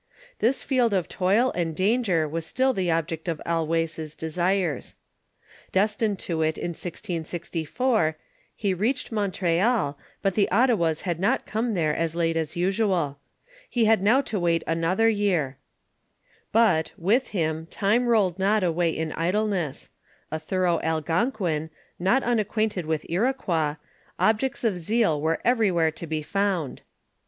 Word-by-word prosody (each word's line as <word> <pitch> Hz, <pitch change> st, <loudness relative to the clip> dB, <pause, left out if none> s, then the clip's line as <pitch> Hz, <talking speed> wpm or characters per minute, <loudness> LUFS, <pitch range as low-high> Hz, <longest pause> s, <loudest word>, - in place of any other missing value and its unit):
This 245 Hz, +4 st, +1 dB
field 245 Hz, -6 st, +2 dB
of 180 Hz, -3 st, 0 dB
toil 205 Hz, +8 st, +2 dB
and 165 Hz, -3 st, -2 dB
danger 190 Hz, -4 st, +2 dB
was 165 Hz, +2 st, -3 dB
still 260 Hz, +9 st, +1 dB
the 185 Hz, -5 st, -1 dB
object 165 Hz, 0 st, -1 dB
of 165 Hz, -3 st, -2 dB
Allouez' 165 Hz, -1 st, -1 dB
desires. 175 Hz, -1 st, -1 dB, 0.8 s
Destined 210 Hz, +1 st, +1 dB
to 165 Hz, -2 st, -2 dB
it 155 Hz, 0 st, +1 dB
in -, -, -3 dB
1664, 170 Hz, -, -2 dB, 0.4 s
he 200 Hz, -3 st, 0 dB
reached 225 Hz, +10 st, -1 dB
Mon 205 Hz, -3 st, 0 dB
treal, 180 Hz, -, +1 dB, 0.3 s
but 195 Hz, -2 st, +2 dB
the 200 Hz, 0 st, +2 dB
Ottawas 200 Hz, -8 st, +2 dB
had 175 Hz, -3 st, -2 dB
not 220 Hz, +8 st, +1 dB
come 220 Hz, 0 st, -1 dB
there 155 Hz, -4 st, +1 dB
as 165 Hz, -1 st, -1 dB
lato 165 Hz, -1 st, +1 dB
as 160 Hz, -2 st, -2 dB
usual 180 Hz, -6 st, 0 dB, 0.5 s
He 235 Hz, -2 st, +2 dB
had 220 Hz, -2 st, +4 dB
now 230 Hz, +7 st, +4 dB
to 215 Hz, -7 st, -3 dB
wait 170 Hz, -1 st, +1 dB
another 165 Hz, +7 st, +1 dB
year; 185 Hz, -11 st, +1 dB, 0.9 s
but; 210 Hz, -8 st, +3 dB
with 225 Hz, +9 st, +2 dB
him, 160 Hz, -4 st, -2 dB
time 215 Hz, +7 st, +1 dB
rolled 200 Hz, -6 st, +2 dB
not 205 Hz, +2 st, +2 dB
away 170 Hz, -1 st, +1 dB
in 160 Hz, -1 st, -3 dB
idleness; 180 Hz, -3 st, -1 dB, 0.4 s
a 155 Hz, -, -2 dB
thorough 175 Hz, +1 st, 0 dB
Algonquin, 160 Hz, -, 0 dB, 0.3 s
not 195 Hz, +10 st, +2 dB
unacquainted 215 Hz, -6 st, 0 dB
with 160 Hz, -1 st, -1 dB
Iroquois, 175 Hz, -, 0 dB, 0.4 s
objects 225 Hz, +5 st, +1 dB
of 205 Hz, -6 st, +1 dB
zeal 175 Hz, -4 st, +1 dB
were 160 Hz, +1 st, 0 dB
everywhere 195 Hz, -10 st, +3 dB
to 165 Hz, +2 st, -8 dB
be 155 Hz, -1 st, -2 dB
found. 195 Hz, -5 st, -1 dB
180 Hz, 140 wpm, -25 LUFS, 165-215 Hz, 0.9 s, had